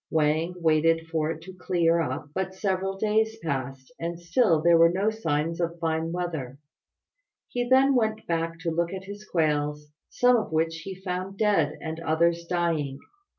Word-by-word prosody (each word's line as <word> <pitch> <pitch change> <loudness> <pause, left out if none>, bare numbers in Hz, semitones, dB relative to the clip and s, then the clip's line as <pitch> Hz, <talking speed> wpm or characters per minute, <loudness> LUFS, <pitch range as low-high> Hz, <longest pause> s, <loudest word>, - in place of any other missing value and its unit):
Wang 160 +3 +1
waited 165 0 +2
for 160 -1 0
it 160 0 -5
to 185 +2 -10
clear 170 -2 +1
up, 145 0 -4
but 190 +1 -3
several 195 0 -1
days 220 +2 +1
passed 135 - -4
and 170 0 -4
still 170 0 +3
there 170 +2 +5
were 165 0 +7
no 195 +5 +1
signs 165 -5 -1
of 170 0 -2
fine 165 0 -1
weather. 160 -7 -4 0.9
He 245 0 -2
then 265 +1 +5
went 220 -3 +1
to 165 0 -2
look 170 +1 0
at 190 -1 -6
his 205 +2 -9
quails, 150 -5 -1 0.2
some 245 0 +4
of 215 - -3
which 165 +1 0
he 190 +4 -7
found 185 +1 -5
dead 180 -9 +2
and 160 0 -5
others 170 +1 +1
dying. 165 -6 -1
170 Hz, 165 wpm, -26 LUFS, 160-190 Hz, 0.9 s, were